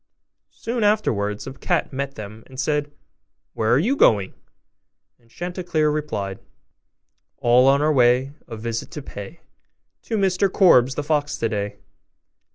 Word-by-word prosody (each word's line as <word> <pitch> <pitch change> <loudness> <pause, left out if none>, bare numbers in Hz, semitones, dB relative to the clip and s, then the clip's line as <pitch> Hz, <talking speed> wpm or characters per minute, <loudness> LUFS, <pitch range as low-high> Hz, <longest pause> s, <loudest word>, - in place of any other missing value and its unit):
Soon 235 -1 -3
afterwards 105 - 0
a 135 - -7
cat 165 +1 -1
met 140 +1 -4
them, 110 +1 -9
and 130 -1 -11
said, 145 +1 -1 0.6
'Where 110 0 0
are - - +5
you 225 - +1
going?' 100 - +3 0.9
And 115 -1 -28
Chanticleer 175 -1 -1
replied, 105 -11 -3 1.0
'All 125 +2 +4
on 140 +2 +4
our 155 0 +3
way 125 +1 +3 0.2
A 115 - -7
visit 115 +1 -4
to 150 - -6
pay 120 +8 -9 0.6
To 225 - -2
Mr 190 -1 +1
Korbes, 135 - +5
the 150 - -2
fox, 145 -1 0
today. 105 -2 -2
135 Hz, 140 wpm, -22 LUFS, 115-160 Hz, 1.0 s, are